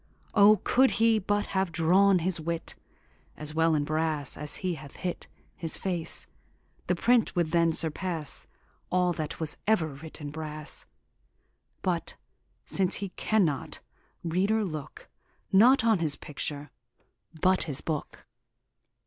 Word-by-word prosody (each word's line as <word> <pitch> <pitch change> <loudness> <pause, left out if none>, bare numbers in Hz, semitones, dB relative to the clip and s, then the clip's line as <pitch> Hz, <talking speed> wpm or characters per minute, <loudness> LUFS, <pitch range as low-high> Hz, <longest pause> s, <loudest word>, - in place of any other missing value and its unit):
O, 210 +1 +7
could 260 +1 +4
he 225 -1 +4
but 205 +1 0
have 190 -2 +1
drawne 185 +5 +4
his 175 -1 +1
wit 165 +1 -3 0.6
As 150 0 -5
well 160 0 +3
in 145 - +1
brasse 155 -2 -1
as 150 -1 -1
he 180 - +1
hath 150 -4 -10
hit 180 -1 -5 0.3
His 165 -2 -3
face, 175 -4 -2 0.6
the 180 - +2
print 235 +4 +2
would 170 -3 +1
then 170 -1 +3
surpasse 160 -1 -2 0.4
All 180 -1 +2
that 155 -2 -5
was 155 -2 -1
ever 180 -8 +3
writ 150 +3 -11
in 145 -2 -6
brasse; 155 -1 -3 1.0
But 175 -3 -1 0.5
since 190 -1 +2
he 200 -1 -4
cannot, 180 -7 0 0.4
reader, 195 +6 +1
looke 155 -6 -7 0.4
Not 235 +7 +6
on 225 -4 +3
his 155 -3 +1
picture, 145 -1 -5 0.7
but 185 -2 +3
his 145 -4 -3
booke. 155 -3 -5
170 Hz, 135 wpm, -28 LUFS, 155-190 Hz, 1.0 s, O